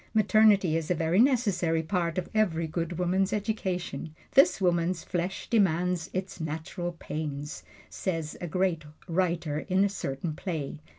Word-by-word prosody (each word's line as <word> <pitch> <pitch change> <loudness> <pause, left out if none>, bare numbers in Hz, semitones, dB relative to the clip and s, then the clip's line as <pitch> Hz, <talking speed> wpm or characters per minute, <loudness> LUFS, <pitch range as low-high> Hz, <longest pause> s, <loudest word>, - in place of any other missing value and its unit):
Maternity 210 -5 +5
is 165 -1 -2
a 180 - +2
very 165 +3 +1
necessary 200 -11 +3
part 170 -1 -1
of 185 - -1
every 180 -7 +2
good 165 +1 -3
woman's 185 +2 +1
education 190 -6 -3 0.2
"this 275 -4 +5
woman's 175 -1 +1
flesh 180 +2 -3
demands 180 -5 +1
its 185 0 -4
natural 165 +3 -4
pains," 150 -3 -5 0.3
says 165 -5 -3
a 175 - -3
great 180 -1 0 0.2
writer 170 -4 0
in 190 +4 +2
a - - +1
certain 155 -4 -3
play. 155 -3 -4
175 Hz, 140 wpm, -28 LUFS, 160-190 Hz, 0.3 s, Maternity